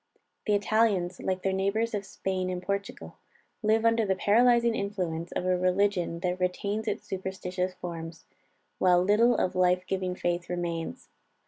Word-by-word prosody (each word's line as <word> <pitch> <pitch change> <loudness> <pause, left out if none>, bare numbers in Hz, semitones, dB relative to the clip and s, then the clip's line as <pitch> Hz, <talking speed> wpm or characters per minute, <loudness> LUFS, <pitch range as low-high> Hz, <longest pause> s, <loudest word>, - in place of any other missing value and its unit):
The 210 - +4
Italians, 200 -4 +1
like 185 0 -2
their 195 - +1
neighbors 200 +4 0
of 205 -2 -3
Spain 185 -1 -2
and 180 -1 -2
Portugal, 200 +1 -4 0.4
live 220 +1 +2
under 230 0 +4
the 195 -2 +1
paralyzing 235 +4 +4
influence 180 -6 -3
of - - -2
a 185 0 +3
religion 180 -1 +1
that 180 0 -1
retains 200 +4 -1
its - - -2
superstitious 185 -1 -3
forms, 165 -2 -7 0.5
while 180 -1 +4
little 220 +5 +4
of 185 - 0
life 180 0 +3
giving 185 -1 -2
faith 175 -1 -2
remains. 170 -2 -4
185 Hz, 150 wpm, -28 LUFS, 180-205 Hz, 0.5 s, The